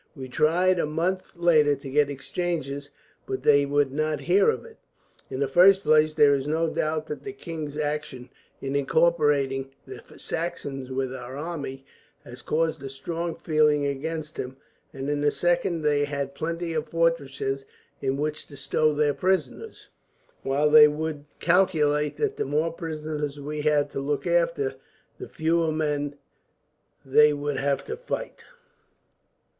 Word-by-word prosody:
We 130 -3 -8
tried 175 +7 +2
a 155 - +1
month 175 +5 -2
later 155 -4 +4
to 140 0 -10
get 145 0 +3
exchanges, 145 -1 -3 0.4
but 130 - -4
they 145 -1 +5
would 145 -1 +1
not 155 +2 -1
hear 410 +4 +4
of 455 - -2
it. 460 -1 -14 0.5
In 130 - -5
the 140 - +2
first 190 +7 +6
place, 155 -2 +4
there 145 -1 +6
is 135 0 -1
no 160 +1 0
doubt 155 0 -1
that 150 -2 -7
the 200 - -5
king's 160 -6 -6
action, 150 -4 -3 0.3
in 135 +1 -3
incorporating 140 -3 +2 0.2
the - - -9 0.2
Saxons 140 -6 -4
with 130 0 -2
our 130 +1 -7
army, 145 -4 -5 0.4
has 120 +1 -10
caused 160 -1 -1
a 135 - -6
strong 165 +5 -4
feeling 150 -2 +2
against 155 +2 -4
him; 130 +1 -5 0.3
and 135 -2 -6
in 145 0 -1
the 145 - +4
second, 175 0 0
they 145 -1 +2
had 140 -1 -4
plenty 165 +3 -3
of 155 -1 -2
fortresses 140 -5 -1 0.3
in 135 0 0
which 150 +1 -3
to 140 - -12
stow 155 +2 +1
their 145 -1 +2
prisoners, 180 -7 -2 0.5
while 145 +3 +1
they 150 0 +10
would 150 -1 -4
calculate 155 -5 +2
that 425 -1 -1
the - - -1
more 155 +4 0
prisoners 155 -3 -4
we 150 +1 -4
had 145 -1 +2
to - - -4
look 140 +1 -2
after, - - +1 0.5
the 390 - -8
fewer 165 0 +1
men 145 -2 -1 0.9
they 150 +3 +6
would 145 -1 -3
have 140 0 0
to 450 - -4
fight. - - -6
150 Hz, 155 wpm, -26 LUFS, 140-165 Hz, 0.9 s, they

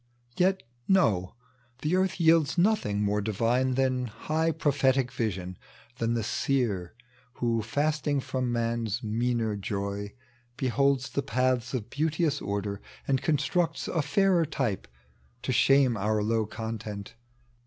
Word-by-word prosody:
Yet 190 +1 +2 0.2
no! 110 - +2 0.5
the 155 +4 +2
earth 190 0 +1
yields 165 -2 +4
nothing 170 - +2
more 105 0 +1
Divine 120 +5 +1
Than 130 -1 +1
high 160 +9 -1
prophetic 135 -4 +1
vision 95 -7 -3 0.2
— 120 - -26
than 115 0 +1
the 115 - -1
Seer 110 -7 -1 0.4
"Who 115 -2 0
fasting 145 +5 0
O.'oia 130 -1 -2
man's 115 -2 -1
meaner 115 0 0
joy 100 0 -4 0.4
heholds 135 0 +1
The 140 - 0
paths 130 -1 0
of 120 -2 -4
beauteous 155 0 0
order, 100 0 -3 0.3
and 135 -2 +2
constructs 160 +4 0
A 165 - 0
fairer 185 -1 +2
type, 120 - -2 0.6
to - - -1
shame 135 -1 +4
our 105 +1 0
low 110 0 +1
content. 110 -2 -6
125 Hz, 130 wpm, -28 LUFS, 110-145 Hz, 0.6 s, yields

